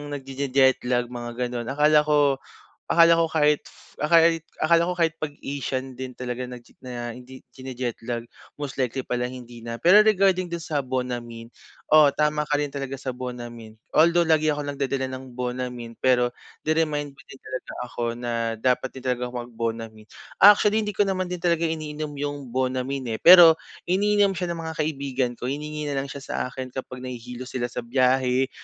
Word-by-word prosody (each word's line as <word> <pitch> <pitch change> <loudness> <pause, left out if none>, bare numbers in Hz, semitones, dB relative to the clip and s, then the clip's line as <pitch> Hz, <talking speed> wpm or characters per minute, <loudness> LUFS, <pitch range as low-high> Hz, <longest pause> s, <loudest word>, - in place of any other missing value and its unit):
nagjejeje-jet 135 -2 +1
lag 120 -1 0
mga 120 -1 -6
ganun 120 -1 -3
akala 150 +2 +4
ko 145 -2 +3 0.5
akala 170 0 +6
ko 165 - +1
kahit, 150 -2 +3 0.4
ah, 150 - 0
kahit, 165 0 +5 0.2
akala 170 +1 +4
ko 180 - -3
kahit 165 -2 +2
pag 155 - -1 0.2
Asian 135 -2 -3
din 130 0 -8
talaga 125 0 -4
naje 125 -1 -11
na 120 -2 -6
hindi 125 +2 -13
jinijetlag 125 -2 -5 0.3
most 140 -2 -4
likely 130 +1 -2
pala 125 0 -2
hindi 120 -2 -10
na. 115 0 -5
Pero 185 - +7
regarding 190 -4 +3
dun 170 - -3
sa 155 -3 -2
Bonamine, 120 -3 -5 0.4
oo 155 -2 +8
tama 150 +1 0
ka 145 - +2
rin 145 -1 -2
talaga 135 -1 -4
sa 130 -1 -5
Bonamine. 120 -3 -8 0.2
Although 170 +2 +5
lagi 155 -1 +3
ako 145 -1 -2
nagdadala 135 -1 -1
ng 130 -1 -8
Bonamine 125 -1 -4
pero 125 -1 +3 0.3
Ni-remind 150 -2 0
mo - - -17
din 135 - -12
talaga 130 - -6
ako 120 - -5
na 120 -1 -4 0.3
dapat 125 +3 +1
din 130 - -9
talagang 125 0 -2
mag 120 0 -7
Bonamine. 115 -1 -5 0.3
Actually 210 +2 +7
hindi 210 -1 -3
ko 205 - +4
naman 185 -2 -1
din 180 - -3
talaga 170 -1 +1
iniinom 150 -2 -5
yung 145 -2 -4
Bonamine, 130 -1 -2
eh. - - -23
Pero, 175 -2 +10 0.3
iniinom 200 +2 +2
siya 180 -1 -3
ng 170 - -4
mga 160 - -4
kaibigan 140 -4 -1
ko - - -6
hiningi 150 +3 -4
nalang 140 -1 -2
siya 140 +1 -7
sa - - -5
akin 130 0 -7
kapag 130 -1 -7
nahihilo 125 0 -7
sila 125 -1 -3
sa 120 0 -6
biyahe, 130 +1 +2
135 Hz, 175 wpm, -24 LUFS, 125-155 Hz, 0.5 s, Pero